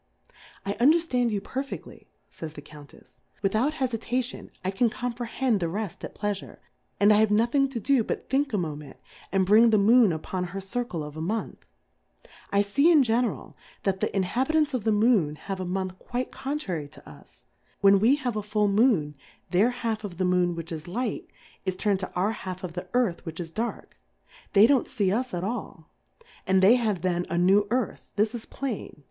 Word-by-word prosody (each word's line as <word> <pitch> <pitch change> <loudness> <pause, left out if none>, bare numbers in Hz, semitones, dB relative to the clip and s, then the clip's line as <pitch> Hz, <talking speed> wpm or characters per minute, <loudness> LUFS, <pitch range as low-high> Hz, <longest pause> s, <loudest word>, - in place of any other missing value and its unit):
I 200 - -1
underfland 265 -3 +3
you 205 -3 -2
perfeftly, 270 +5 -6 0.2
fays 160 -2 -8
the 145 - -9
Cotmtefs^ 145 -1 -16 0.2
without 220 +9 +1
Hefitation, 250 -1 -2 0.2
I 190 - +1
can 230 +5 +2
comprehend 245 -1 -1
the 170 -2 -1
reft 200 0 -5
at - - -7
Pleafure, 205 -2 -4 0.4
and 205 +2 +6
I - - +5
have 220 0 +4
nothing 240 +6 +2
to 255 -3 -4
do 260 +1 +2
but - - -4
thiiik 275 +1 +1
a 210 - 0
Mo 160 -5 -2
ment, 145 -2 -11 0.3
and 190 -1 +2
bring 220 +4 +6
the 220 - +4
Moon 220 +1 +5
upon 180 +3 -3
her 185 +2 -6
Circle 195 -4 -3
of 150 0 -8
a 155 - -5
Month. 215 +7 -3 0.9
I 200 0 +3
fee 280 +12 +3
in 305 -5 +6
general 235 -2 -1 0.3
that, 190 -1 0
the - - 0
Inhabitants 265 - +1
of 245 -5 -2
the 220 - +3
Moon 210 -8 +3
have 195 +4 -6
a 185 - -3
Month 185 0 -3
quite 245 +1 -4
contrary 265 - -4
to 145 - -16
us; - - -15 0.4
when 200 -1 +6
we 235 +7 +5
have 255 -6 -3
a 210 - -1
full 210 0 +1
Moon, 200 - +3 0.4
their 195 +6 +4
half 230 -3 -3
of 185 -5 -7
the 185 - 0
Moon 180 -1 +2
which 165 0 -6
is 155 -1 -6
Light, 230 +5 -3 0.3
is 185 -1 -2
turned 200 -1 +1
to 185 - -5
our 190 +4 +1
half 185 -4 -7
of 175 -3 -5
the 180 +1 -6
Earth 230 -9 +1
which 165 0 -7
is 165 -2 -5
Dark; 230 +6 -4 0.6
they 200 +1 +8
don't 265 +1 +3
fee 200 -6 0
us 250 +5 -1
at 175 -1 -3
a!l, 200 -7 -5 0.6
and 190 0 +3
they 200 +5 +8
have 220 -7 0
then 175 -1 +1
a - - -2
New^ 195 +4 +4
Earth, 245 -1 -2
this 210 +2 +1
is 235 -2 -6
plain. 265 -6 -5
210 Hz, 195 wpm, -26 LUFS, 185-245 Hz, 0.9 s, they